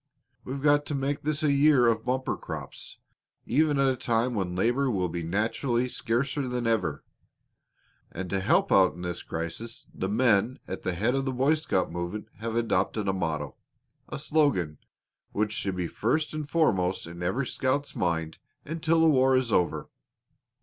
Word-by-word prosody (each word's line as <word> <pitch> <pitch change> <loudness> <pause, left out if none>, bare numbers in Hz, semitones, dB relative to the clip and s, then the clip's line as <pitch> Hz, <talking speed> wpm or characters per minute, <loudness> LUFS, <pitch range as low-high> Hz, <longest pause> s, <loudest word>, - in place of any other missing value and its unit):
We've 135 +2 -5
got 145 0 +4
to 145 - -2
make 140 +1 -1
this 155 +1 -1
a 150 - +4
year 140 -2 +5
of 115 -1 +2
bumper 130 +1 0
crops, - - -7 0.5
even 150 +2 +2
at 140 0 +3
a - - -5
time 120 0 0
when 95 -5 -2
labor 120 +8 +2
will 95 -6 0
naturally 110 - 0
be 125 - -3
scarcer 130 +4 -1
than 125 -1 -2
ever. 115 -1 0 1.1
And 95 +2 -5
to 95 - +1
help 95 - +2
out 95 -3 +5
in 90 - -8
this 90 -1 -3
crisis 85 +8 -5
the 95 - -3
men 115 +1 +3
at 95 - -5
the 90 - -1
head 110 +7 +1
of 135 0 0
the 135 - 0
Boy 135 +4 +3
Scout 150 - 0
movement 85 +5 -4
have 115 0 -3
adopted 105 -2 0
a 95 - +2
motto 80 -6 -3 0.5
a 150 - -4
slogan 140 - +1 0.5
which 105 +1 0
should 95 -3 -2
be 90 -1 -2
first 155 - 0
and 155 -2 -4
foremost 95 - +1
in 85 +1 -9
every 95 +10 0
scout's 135 +4 -1
mind 80 -2 -1 0.3
until 165 +1 +1
the 165 - +6
war 130 -3 +4
is 125 -3 0
over. 90 -4 +1
115 Hz, 175 wpm, -27 LUFS, 95-140 Hz, 1.1 s, the